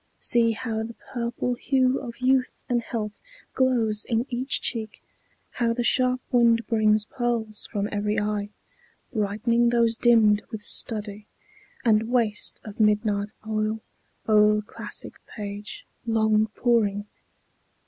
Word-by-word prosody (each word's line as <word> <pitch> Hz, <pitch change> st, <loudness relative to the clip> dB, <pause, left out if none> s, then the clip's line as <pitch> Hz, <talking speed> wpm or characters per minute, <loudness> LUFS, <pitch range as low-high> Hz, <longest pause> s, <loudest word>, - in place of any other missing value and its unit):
See 230 Hz, -1 st, +3 dB
how 220 Hz, -1 st, -3 dB
the 225 Hz, +1 st, -6 dB
purple 240 Hz, 0 st, -3 dB
hue 260 Hz, +1 st, +1 dB
of 245 Hz, -2 st, -9 dB
youth 255 Hz, 0 st, +1 dB
and 240 Hz, -1 st, +1 dB
health 220 Hz, -2 st, -4 dB, 0.4 s
Glows 230 Hz, -5 st, +1 dB
in 230 Hz, 0 st, 0 dB
each 255 Hz, +3 st, 0 dB
cheek; 220 Hz, -3 st, -2 dB, 0.5 s
how 235 Hz, -2 st, 0 dB
the 240 Hz, +1 st, -2 dB
sharp 255 Hz, +1 st, +2 dB
wind 235 Hz, -2 st, +4 dB
brings 215 Hz, -2 st, +2 dB
pearls 230 Hz, -3 st, -2 dB
From 205 Hz, -2 st, -2 dB
every 210 Hz, +1 st, 0 dB
eye, 210 Hz, -1 st, -2 dB, 0.6 s
brightening 230 Hz, +3 st, +1 dB
those 235 Hz, -1 st, +2 dB
dimmed 220 Hz, -3 st, +4 dB
with 220 Hz, -3 st, -7 dB
study, 210 Hz, -1 st, -1 dB, 0.6 s
And 220 Hz, 0 st, +3 dB
waste 230 Hz, -4 st, 0 dB
of 210 Hz, 0 st, -10 dB
midnight 210 Hz, -1 st, +1 dB
oil, 215 Hz, 0 st, -1 dB, 0.5 s
o'er 210 Hz, -1 st, +4 dB
classic -, -, -7 dB
page 205 Hz, -1 st, -7 dB, 0.2 s
Long 220 Hz, -1 st, +3 dB
poring. 210 Hz, -4 st, +1 dB
225 Hz, 125 wpm, -25 LUFS, 210-240 Hz, 0.6 s, wind